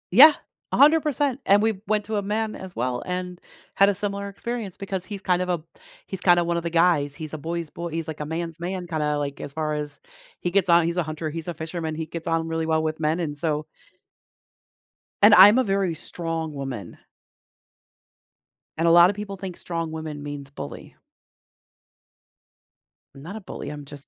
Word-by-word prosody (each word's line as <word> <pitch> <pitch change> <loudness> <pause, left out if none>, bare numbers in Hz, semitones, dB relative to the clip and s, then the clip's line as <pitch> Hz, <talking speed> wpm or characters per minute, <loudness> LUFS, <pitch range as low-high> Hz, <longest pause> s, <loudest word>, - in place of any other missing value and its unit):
Yeah, 300 +6 +11 0.4
100%. 290 -3 +3
And 200 +1 +5
we 220 -3 +1
went 210 -1 +1
to 215 -1 -2
a - - +1
man 215 +2 -2
as 190 -1 -9
well, 125 +1 -1
and 180 0 -4 0.3
had 195 +1 +5
a 200 - 0
similar 200 0 -3
experience 215 -1 -5
because 190 -2 -4
he's 200 0 -7
kind 180 -1 +1
of 180 - -2
a 170 -3 -1 0.4
he's 190 -2 -6
kinda 175 -1 +5
one 170 0 -1
of 170 - 0
the 170 - -3
guys, 165 -4 +2
he's 155 0 -6
a 155 - -4
boy's 165 +1 -4
bo 170 0 -5
he's 165 -1 -4
like 160 -1 -6
a 150 - -3
man's 165 +1 -4
man 180 +1 -4
kinda 150 -3 -1
like, 140 -1 -4
as - - -6
far 155 -1 -2
as 150 -1 -4 0.4
he 175 - -2
gets 190 0 +2
on 170 -1 +6
he's 170 +1 -1
a 175 - +2
hunter, 155 0 -4
he's 165 +1 -6
a 175 - -4
fisherman, 160 0 -4
he 160 0 -3
gets 165 +1 -7
on 165 0 0
really 165 0 -2
well 160 0 +2
with 155 0 -2
men, 155 +2 +1
and 150 -4 -2
so 150 0 -1 1.6
And 205 +1 +8
I'm 205 +5 +9
a 260 - +4
very 195 -5 0
strong 165 -1 -4
woman 135 -7 -6 1.8
and 165 +1 +2
a - - +6
lotta 175 +3 +7
people 200 -1 -6
think 185 -2 -7
strong 165 -2 -4
woman 155 -2 -6
means 145 -1 -7
bully. 105 - -9 2.2
I'm 135 - -12
not 175 +8 -8
a 220 - -7
bully, 185 - -7
I'm 145 -1 -7
just 140 0 -11
170 Hz, 195 wpm, -24 LUFS, 155-195 Hz, 2.2 s, Yeah